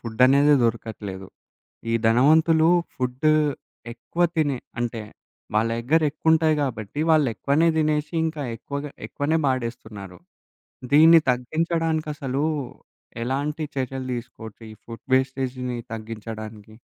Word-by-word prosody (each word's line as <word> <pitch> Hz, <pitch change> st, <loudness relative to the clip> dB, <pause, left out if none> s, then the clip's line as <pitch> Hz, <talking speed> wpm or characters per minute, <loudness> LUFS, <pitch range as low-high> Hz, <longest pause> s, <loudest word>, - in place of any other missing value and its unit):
ఫుడనేదే 130 Hz, +6 st, +4 dB
దొరకట్లేదు. 105 Hz, -4 st, -4 dB, 0.6 s
ఈ -, -, +2 dB
ధనవంతులు 160 Hz, +7 st, +4 dB, 0.3 s
ఫుడ్డు 130 Hz, +4 st, 0 dB, 0.6 s
ఎక్కువ 125 Hz, +9 st, -4 dB
తినే, 145 Hz, -5 st, +1 dB, 0.2 s
అంటే 115 Hz, -2 st, -3 dB, 0.5 s
వాళ్ళ 110 Hz, +2 st, +2 dB
దగ్గర 155 Hz, +8 st, +2 dB
ఎక్కువుంటాయి 160 Hz, +1 st, +2 dB
కాబట్టి, 115 Hz, 0 st, -4 dB
వాళ్ళు 155 Hz, -5 st, +4 dB
ఎక్కువనే 145 Hz, +9 st, +2 dB
దినేసి, 155 Hz, 0 st, 0 dB
ఇంకా 160 Hz, -2 st, -3 dB
ఎక్కువగా 140 Hz, +5 st, -6 dB, 0.2 s
ఎక్కువనే 155 Hz, +3 st, 0 dB
బాడేస్తున్నారు. 115 Hz, -7 st, -4 dB, 0.8 s
దీన్ని 165 Hz, +2 st, +8 dB
తగ్గించడానికసలు 155 Hz, 0 st, -1 dB, 0.8 s
ఎలాంటి 145 Hz, +5 st, -2 dB
చర్యలు 130 Hz, 0 st, -3 dB
దీసుకోవచ్చు, 115 Hz, -2 st, -9 dB
ఈ -, -, -11 dB
ఫుడ్ 115 Hz, -1 st, -10 dB
వేస్టేజ్‌ని 130 Hz, -1 st, -1 dB, 0.2 s
తగ్గించడానికి? 110 Hz, -1 st, -8 dB
130 Hz, 100 wpm, -23 LUFS, 115-155 Hz, 0.8 s, దీన్ని